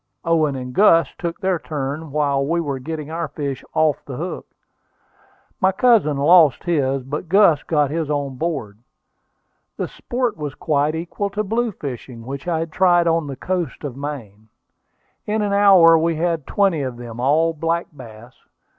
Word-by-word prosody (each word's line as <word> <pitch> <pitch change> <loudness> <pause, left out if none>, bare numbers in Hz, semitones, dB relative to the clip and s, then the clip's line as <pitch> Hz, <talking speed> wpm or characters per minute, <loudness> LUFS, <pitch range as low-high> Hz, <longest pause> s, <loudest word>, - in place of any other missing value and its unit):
Owen 160 -4 +2
and 125 -1 -6
Gus 165 -3 +4
took 170 -1 -4
their 190 -3 0
turn 150 +1 -5
while 140 -1 0
we 165 +5 0
were 140 -5 -3
getting 155 +2 -6
our 165 0 -3
fish 140 -3 -5
off 155 -2 +2
the 135 - -8
hook. 175 +4 -5 1.1
My 190 - +3
cousin 195 - +3
lost 150 -1 +5
his, 135 -6 0
but 150 +5 -5
Gus 180 -6 +5
got 150 -3 0
his 160 -1 -2
on 145 -2 -2
board. 130 -11 -4 1.0
The - - -2
sport 245 -4 -3
was 145 -3 -5
quite 150 +1 0
equal 175 +5 -3
to 210 +2 -2
blue 225 +3 -1
fishing, 125 - -8
which 140 +4 -7
I 170 -2 0
had 165 -1 -5
tried 175 0 +3
on 165 -2 +1
the 140 - -5
coast 175 +1 -3
of 140 -4 -5
Maine. 115 -7 -7 0.8
In 210 0 0
an 205 -1 -1
hour 190 -5 +6
we 165 +1 0
had 165 -2 -1
twenty 195 -7 +1
of 130 -3 -4
them, 120 -1 -9
all 155 +6 +2
black 165 +2 -1
bass. 120 -2 -12
155 Hz, 170 wpm, -20 LUFS, 140-170 Hz, 1.1 s, hour